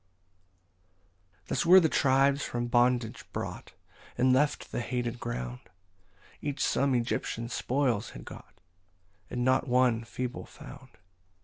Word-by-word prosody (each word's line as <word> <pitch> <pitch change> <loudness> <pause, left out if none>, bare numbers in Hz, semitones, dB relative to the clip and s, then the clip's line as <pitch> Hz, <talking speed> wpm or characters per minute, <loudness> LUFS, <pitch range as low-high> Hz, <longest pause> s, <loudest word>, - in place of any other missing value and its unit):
15 - - -40
Thus 130 - 0
were 185 +2 +9
the 165 - +3
tribes 140 0 +3
from 120 0 -2
bondage 120 -1 +1
brought, - - -6 0.4
And 130 0 +4
left 145 +3 +1
the - - -2
hated 120 -1 -3
ground; 60 - -5 0.8
Each 145 -2 -2
some 140 -1 +1
Egyptian 115 -1 -2
spoils 125 -3 0
had - - -11
got, - - -12 0.7
And 125 0 -2
not 130 +2 +2
one 125 -2 +3
feeble 125 +4 -5
found. 140 -2 -12
125 Hz, 125 wpm, -29 LUFS, 120-135 Hz, 0.8 s, were